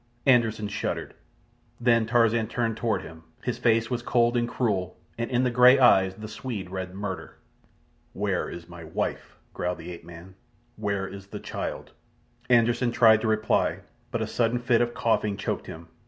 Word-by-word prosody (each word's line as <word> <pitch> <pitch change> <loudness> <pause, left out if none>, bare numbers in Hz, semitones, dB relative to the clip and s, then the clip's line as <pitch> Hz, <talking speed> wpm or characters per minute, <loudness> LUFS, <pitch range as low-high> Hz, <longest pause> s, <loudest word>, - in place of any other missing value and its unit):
Anderssen 115 -5 +3
shuddered. 105 +1 -3 0.7
Then 115 -2 +3
Tarzan 115 -1 +3
turned 115 -1 -1
toward 110 -5 -1
him. 80 0 -11 0.2
His 125 - -2
face 115 0 +2
was 120 -1 -1
cold 120 0 +2
and 120 0 +1
cruel, 95 -8 -1 0.2
and 115 0 -3
in 125 0 +1
the 125 - +1
grey 125 +2 +7
eyes 95 -7 +5
the 110 +1 -8
Swede 110 -5 -6
read 95 -1 -5
murder. 100 -1 -6 0.8
"Where 100 -2 -1
is 85 -1 -9
my 90 -1 -10
wife?" 80 0 -4 0.2
growled 90 0 -2
the 90 - -8
ape 85 - -9
man. 85 +2 -12 0.4
"Where 100 -2 -2
is 100 0 -10
the - - -7
child?" - - -5 0.6
Anderssen 120 0 +3
tried 110 -2 +5
to 110 - -1
reply, 110 0 +1 0.3
but - - -2
a - - -1
sudden 115 0 +1
fit 120 -1 +2
of 120 0 -1
coughing 105 -3 +1
choked - - -3
him. 80 +1 -9
110 Hz, 170 wpm, -26 LUFS, 95-120 Hz, 0.8 s, grey